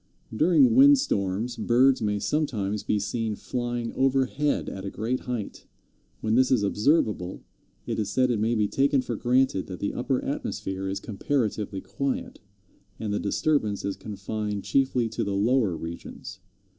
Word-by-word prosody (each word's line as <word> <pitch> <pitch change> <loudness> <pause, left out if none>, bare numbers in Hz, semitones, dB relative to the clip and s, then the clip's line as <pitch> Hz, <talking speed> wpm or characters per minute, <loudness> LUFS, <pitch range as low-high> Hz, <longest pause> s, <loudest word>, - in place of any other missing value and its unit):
During 180 - +5
windstorms 125 - +4
birds 130 +2 +3
may 105 -1 0
sometimes 105 -6 -1
be 105 - 0
seen 110 +2 -2
flying 120 0 -3
overhead 135 +2 +1
at 95 - -6
a 100 - -3
great 115 +6 -2
height. 120 -5 -5 0.5
When 110 - 0
this 130 +2 +4
is 120 -5 +3
observable, 105 - +1 0.4
it - - -2
is 105 -2 -1
said 130 +4 +2
it 115 - 0
may 115 +3 +1
be 105 -2 +2
taken 135 +3 +2
for 120 - -3
granted 125 -4 +1
that 90 -2 -7
the 100 - -2
upper 130 +1 0
atmosphere 95 -8 -3
is 95 +1 -2
comparatively 105 -3 -2
quiet, 140 -1 -3 0.6
and 105 -2 -2
the 105 - 0
disturbance 105 -1 0
is 100 - -2
confined 105 0 -4
chiefly 130 -3 +1
to 110 - -2
the 100 -1 -2
lower 105 -3 +2
regions. 85 +1 -8
115 Hz, 155 wpm, -26 LUFS, 100-130 Hz, 0.6 s, During